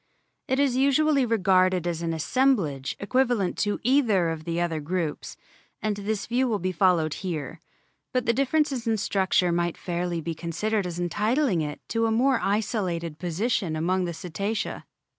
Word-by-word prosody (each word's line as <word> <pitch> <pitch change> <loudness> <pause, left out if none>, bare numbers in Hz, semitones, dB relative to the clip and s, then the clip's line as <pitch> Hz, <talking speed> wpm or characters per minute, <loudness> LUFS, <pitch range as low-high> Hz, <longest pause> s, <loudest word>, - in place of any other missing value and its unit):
It 260 +1 +1
is 275 -3 +2
usually 275 0 +3
regarded 185 -4 +3
as 170 -1 -2
an 165 -1 -1
assemblage 165 - +1
equivalent 240 -3 +1
to 205 0 0
either 225 -9 +3
of 160 -1 -5
the 170 0 -2
other 170 -2 -1
groups, 160 0 -3 0.4
and 215 -1 -1
this 205 +1 -3
view 250 +2 +1
will 220 -3 0
be 185 0 -2
followed 170 -4 +2
here. 165 -7 -4 0.5
But 255 -2 0
the 230 - +3
differences 275 -1 0
in 225 -1 +2
structure 190 -3 +1
might 170 0 0
fairly 175 -1 -2
be 165 +1 -3
considered 180 +5 -2
as 175 0 -5
entitling 210 - +1
it 150 -1 -5
to 230 0 +1
a - - 0
more 255 +3 +3
isolated 185 -6 -1
position 180 0 -1
among 180 +4 0
the 170 - -3
Cetacea. 200 +6 -3
190 Hz, 160 wpm, -26 LUFS, 170-230 Hz, 0.5 s, usually